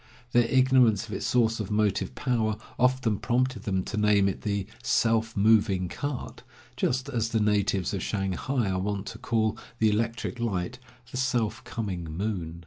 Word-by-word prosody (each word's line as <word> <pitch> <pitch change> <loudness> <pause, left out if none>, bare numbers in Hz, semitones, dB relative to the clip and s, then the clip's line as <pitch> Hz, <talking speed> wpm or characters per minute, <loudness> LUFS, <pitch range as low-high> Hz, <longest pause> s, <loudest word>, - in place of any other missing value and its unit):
Their 120 -1 +4
ignorance 125 -5 +4
of 105 - -7
its - - -2
source 115 -2 +2
of 105 - -3
motive 105 -2 0
power 110 -4 0 0.2
often 125 -4 +2
prompted 125 0 0
them 95 -2 0
to 105 - -5
name 105 -2 +4
it 95 - -3
the 100 -2 -1 0.2
"self 115 -1 +1
moving 100 -3 +3
cart," 145 +3 -5 0.3
just 130 +2 0
as 115 -5 -1
the 115 - +1
natives 100 -2 +1
of 100 - -2
Shanghai 100 +3 -1
are 95 - -1
wont 100 +1 -2
to 115 - -9
call 110 -2 0 0.2
the 110 -1 +3
electric 115 +2 -2
light 115 +1 -2 0.3
"the - - -5
self 120 -4 0
coming 95 -7 -4
moon." 85 -1 -4
110 Hz, 165 wpm, -27 LUFS, 100-120 Hz, 0.3 s, Their